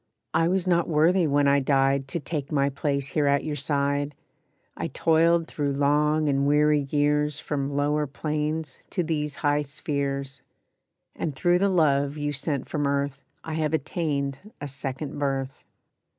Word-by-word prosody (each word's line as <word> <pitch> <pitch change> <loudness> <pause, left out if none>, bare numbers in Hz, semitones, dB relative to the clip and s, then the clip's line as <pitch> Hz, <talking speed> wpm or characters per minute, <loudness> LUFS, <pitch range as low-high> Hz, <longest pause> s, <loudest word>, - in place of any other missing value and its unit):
I 165 +1 +3
was 185 +1 +1
not 170 -2 +2
worthy 165 +3 +3
when 145 0 +3
I 140 0 +5
died 135 0 +2
To 170 - -3
take 150 -2 -4
my 140 -1 +2
place 140 -1 -1
here 150 -2 +1
at 140 0 +2
your 155 -1 -3
side; 140 0 -1 0.6
I - - -3
toiled 165 +1 +3
through 145 -3 -2
long 150 +2 +2
and 140 0 +2
weary 150 -1 +3
years 150 0 +1
From 140 -2 -3
lower 150 +1 +1
planes 150 +1 -3
to 180 - -1
these 150 -3 -2
high 145 0 +3
spheres; 140 -2 -3 0.7
And 150 -4 -3
through 175 +6 +3
the 200 +1 +3
love 145 -5 +2
you 145 0 -2
sent 140 0 -3
from 145 -2 -1
earth 140 -1 -1 0.2
I 160 - -5
have 155 0 0
attained 140 -3 -2 0.2
a 145 - -5
second 140 +1 -5
birth. 135 -1 -2
145 Hz, 160 wpm, -26 LUFS, 140-155 Hz, 0.7 s, I